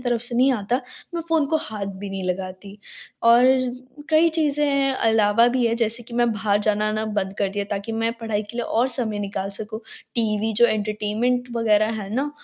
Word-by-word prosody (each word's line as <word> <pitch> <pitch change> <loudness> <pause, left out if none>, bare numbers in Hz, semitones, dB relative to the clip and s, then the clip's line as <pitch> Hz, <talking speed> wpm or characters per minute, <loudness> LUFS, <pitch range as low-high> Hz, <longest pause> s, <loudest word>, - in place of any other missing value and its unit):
तरफ़ 240 -2 -1
से 240 0 -4
नहीं 260 +2 +5
आता, 240 +3 -1 0.3
मैं 335 - -2
फ़ोन 320 -3 +2
को 315 - +1
हाथ 215 -8 -5
भी 200 -1 -5
नहीं 190 -1 -4
लगाती। 185 +2 -5 0.4
और 235 +1 +6 0.6
कई 320 +1 +5
चीज़े 295 -2 +1
हैं 275 -1 +2
अलावा 225 -1 +3
भी 245 -1 +1
है 230 - +1
जैसे 230 0 -1
कि 235 +1 -11
मैं 240 -1 +2
बाहर 205 -1 +1
जाना-आना 215 +1 0
बंद 190 -2 -1
कर 200 -2 +1
दिया 200 +1 -3
है - - -17
ताकि 200 +2 -3
मैं 225 +1 0
पढ़ाई 215 -2 -1
के 210 +3 -11
लिए 240 - -1
और 240 +3 +1
समय 230 -4 -1
निकाल 195 -1 -3
सकूँ। 215 +2 -5 0.4
टीवी 220 -1 0
जो 235 +3 +5
एंटरटेनमेंट 215 +4 -1
वग़ैरह 215 -1 +3
है 195 - -7
न 290 +2 0
225 Hz, 205 wpm, -23 LUFS, 205-245 Hz, 0.6 s, और